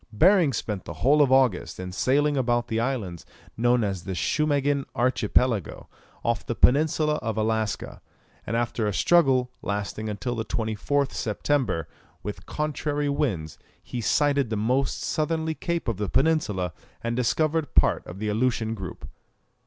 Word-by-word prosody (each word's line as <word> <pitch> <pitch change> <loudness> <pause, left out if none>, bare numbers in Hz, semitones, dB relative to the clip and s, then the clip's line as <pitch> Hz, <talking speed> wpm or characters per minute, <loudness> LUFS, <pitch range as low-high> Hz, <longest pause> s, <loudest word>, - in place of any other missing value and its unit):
Behring 180 - +5
spent 105 -5 -4
the - - -6
whole 150 +3 +6
of 140 -3 +4
August 130 -6 +2
in 90 0 -5
sailing 145 +9 +2
about 120 -2 +1
the 115 - 0
islands 115 -9 -2 0.3
known 120 +1 +2
as 95 -4 -2
the 95 - -4
Schumagin 145 - +1
archipelago, 120 -3 +1 0.4
off 115 0 0
the 120 - -3
peninsula 150 +3 +3
of 110 -2 -3
Alaska; 110 -1 -1 0.5
and 115 - 0
after 115 -2 -1
a 100 - -1
struggle, 135 -7 +3
lasting 105 +1 -3
until 115 +4 -3
the 115 -2 -2
24th 115 +6 -1
September, 110 - -1 0.4
with 105 - -6
contrary 150 -1 -2
winds, 100 - -2 0.2
he 120 - -5
sighted 140 +1 +2
the 110 - -1
most 125 +6 0
southerly 160 0 -1
cape 170 0 -3
of 115 -5 -1
the 105 -1 -2
peninsula, 105 - +1 0.3
and 115 0 -1
discovered 155 +4 0
part - - +4
of 90 - -8
the 105 +2 -3
Aleutian 110 0 0
group. 95 -5 -7
120 Hz, 150 wpm, -25 LUFS, 105-145 Hz, 0.5 s, whole